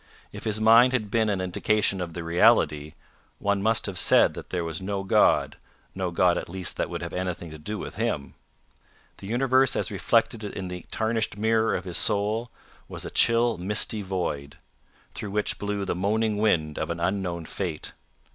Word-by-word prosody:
If - - -9
his 110 -1 +1
mind 115 +3 +6
had 110 -5 -1
been 110 -1 +2
an 100 -2 0
indication 95 +1 0
of 85 -2 -5
the 85 - -4
reality, 75 -2 +3 0.4
one 100 -1 0
must 110 +2 +2
have 95 -3 -2
said - - +5
that - - -9
there 90 -2 -2
was 80 +1 -4
no 95 0 -3
God 95 - +3 0.4
no 95 -1 -2
God 85 0 +2
at - - -8
least 95 0 -3
that - - -1
would - - -5
have - - -6
anything 90 -2 -4
to 80 - -10
do 105 +8 -5
with - - -7
him. 110 -11 -2 0.8
The 95 - -10
universe 130 +3 +2
as - - -1
reflected 110 -2 +1
in 95 -2 -5
the 90 -1 -8
tarnished 110 -1 -1
mirror 110 +1 +2
of 95 - -4
his 90 -3 +1
soul, 110 +3 +1 0.4
was - - -5
a - - -6
chill 115 -3 +3
misty 105 +3 0
void, 85 -7 -4 0.6
through 105 - -6
which 105 +1 -1
blew 100 -1 -2
the - - -1
moaning 105 +3 0
wind 80 -8 +1
of 80 - -3
an 85 0 -3
unknown 90 -2 -2
fate. 85 -2 -4
100 Hz, 185 wpm, -26 LUFS, 90-110 Hz, 0.8 s, mind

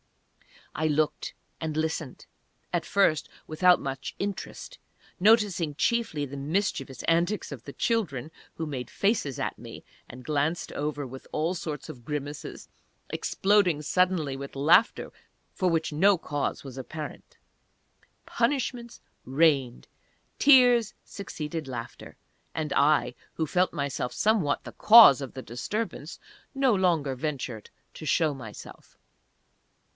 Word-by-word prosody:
I 155 - 0
looked 155 0 -1 0.2
and 160 -2 -4
listened, 155 -3 -3 0.5
at - - 0
first 165 -6 +2 0.2
without 180 +3 +4
much 135 -1 -5
interest, 205 - -6 0.4
noticing 195 -7 +3
chiefly 215 - 0
the 140 +1 -8
mischievous 150 -1 -2
antics 170 +4 0
of 135 -5 -8
the 140 - -8
children, 160 - -1 0.2
who 160 - -4
made 130 -5 -5
faces 195 - 0
at - - -3
me, - - -10 0.3
and 125 +1 -11
glanced 150 +2 -1
over 145 -1 -3
with 130 +1 -10
all 160 +4 0
sorts 155 -5 -5
of 120 -2 -11
grimaces 145 0 -6 0.4
exploding 190 -6 +2
suddenly 175 -4 +1
with 140 +1 -8
laughter 165 - +3 0.4
for 185 -3 +1
which 160 -2 0
no 190 +5 +4
cause 145 -3 -3
was 135 -2 -9
apparent.... 155 +3 -8 0.9
Punishments 240 -1 -2 0.2
rained! 135 -3 +1 0.5
Tears 245 -5 +6
succeeded 160 -5 -6
laughter! 120 -3 -8 0.4
And 155 -2 -3
I, 140 -4 +3 0.2
who 160 - -1
felt 180 +4 +1
myself 140 -5 -3
somewhat 210 -10 +1
the - - -8
cause 215 - +8
of 135 - -6
the 130 - -7
disturbance, 165 - -5 0.4
no 270 -3 +3
longer 170 -8 +1
ventured 130 -5 -5 0.3
to 155 - -8
show 155 0 +2
myself. 115 -6 -11
155 Hz, 125 wpm, -27 LUFS, 140-190 Hz, 0.9 s, cause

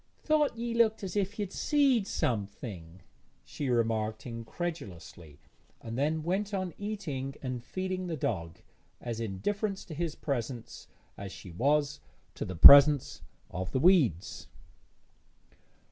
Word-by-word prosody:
'Thought 300 -5 +1
ye 235 0 -3
looked 225 -2 +2
as 190 0 -5
if 205 +1 -1
ye'd 205 -3 -4
seed 275 -8 +2
something',' 100 - -4 0.4
she 140 -3 -4
remarked 110 -2 0
incredulously, 115 - -7 0.4
and 115 0 -7
then 155 +4 0
went 195 +4 -1
on 185 -2 -3
eating 150 -11 -4
and 125 -2 -4
feeding 185 +3 -4
the 165 -2 -3
dog, 85 - -3 0.4
as 115 -2 -5
indifferent 195 - -2
to 170 - -10
his 160 0 -3
presence 120 -4 -5 0.3
as 100 -1 -7
she 95 - -11
was 140 - +1 0.3
to - - -5
the 95 - -6
presence 140 - +8 0.3
of 95 +1 -4
the 130 - +1
weeds. 140 - +2
140 Hz, 130 wpm, -30 LUFS, -, 0.4 s, presence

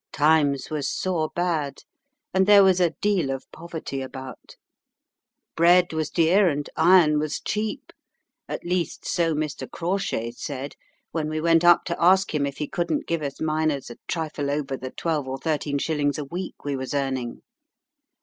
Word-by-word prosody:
Times 145 -2 +2
was 145 -3 -1
sore 170 -4 -1
bad, 160 -6 -1 0.5
and 190 +1 +3
there 205 -1 +8
was 190 -1 +4
a 175 -2 +4
deal 195 -9 +1
of 135 0 -4
poverty 160 -5 -6
about. 130 -1 -9 1.0
Bread 175 +1 +5
was 155 -1 -1
dear, 175 +3 +4
and 145 -1 -3
iron 160 -3 +5
was 150 -1 -2
cheap 215 0 -3 0.6
at - - -5
least 175 -1 -2
so 165 -2 +1
Mr. 150 -1 -3
Crawshay 170 - -2
said 135 +3 -6 0.4
when 155 -1 -2
we 155 0 -2
went 165 +1 +3
up 175 -1 +6
to 170 -1 -4
ask 190 +1 +4
him 145 -2 +1
if 140 - -6
he 150 - -3
couldn't 175 - -1
give 165 -1 -1
us 140 -2 -5
miners 155 -4 -1
a - - -10
trifle 155 -3 -3
over 140 -1 -2
the 130 0 -6
twelve 155 -1 -2
or 130 0 -3
thirteen 145 0 -1
shillings 145 -1 0
a 150 - -4
week 175 +3 -7
we 145 -1 -1
was 130 +1 -4
earning. 130 -4 -2
155 Hz, 170 wpm, -24 LUFS, 140-175 Hz, 1.0 s, there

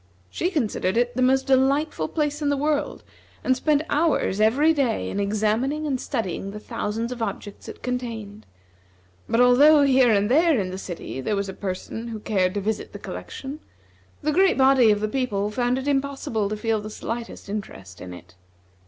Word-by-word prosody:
She 355 - -1
considered 230 - -1
it 245 0 +1
the 255 - 0
most 265 +1 +3
delightful 270 - +2
place 295 - -2
in 290 - +1
the 285 - +1
world, 295 +1 -1 0.4
and 260 - +2
spent 300 +2 +1
hours 290 - +1
every 280 +9 +4
day 265 -7 0
in 200 - -3
examining 215 +9 0
and 270 -4 -1
studying 195 - -3
the 210 +1 -7
thousands 225 +3 -3
of 245 -2 -6
objects 205 -2 -5
it - - -11
contained; 225 -4 -5 0.8
but 230 - +2
although 285 +5 +6
here 265 -3 +5
and 205 -1 +3
there 310 +2 +4
in 185 -2 -2
the 185 - -5
city 170 -8 -6
there 210 - -1
was 200 -1 -2
a - - -5
person 200 +4 -5
who 225 -2 -5
cared 190 -3 0
to 205 - -1
visit 215 +2 -3
the - - -6
collection, 275 +3 -7 0.6
the 305 - +1
great 375 +4 +3
body 265 -3 +5
of 210 -1 +2
the 215 - 0
people 210 -5 -1
found 245 +2 0
it 265 +1 -4
impossible 270 -7 -1
to 215 - -3
feel 220 0 0
the 215 - -7
slightest 230 +1 -6
interest 95 - -7
in 90 - -8
it. 90 0 -12
235 Hz, 190 wpm, -24 LUFS, 205-275 Hz, 0.8 s, although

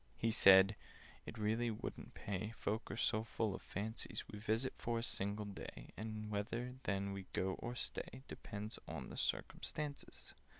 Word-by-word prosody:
He 115 - +2
said 95 0 +9 0.5
"It 115 - -5
really 110 +3 +2
wouldn't 110 - -5
pay— 105 +3 -2
Folk 110 +3 -1
are 105 - -3
so 110 -1 +3
full 110 -2 0
of - - -5
fancies. 110 +4 -3
We 105 - -7
visit 110 +4 +1
for 115 0 0
a 115 - 0
single 105 -1 -1
day, 100 -1 -7
And 110 0 -4
whether 115 +5 -1
then 100 0 +1
we 95 -1 -5
go, 95 0 +2
or 120 +1 -3
stay, 130 +1 -4
Depends 105 0 -5
on - - -5
circumstances. 145 -2 -2
110 Hz, 160 wpm, -40 LUFS, 100-115 Hz, 0.5 s, said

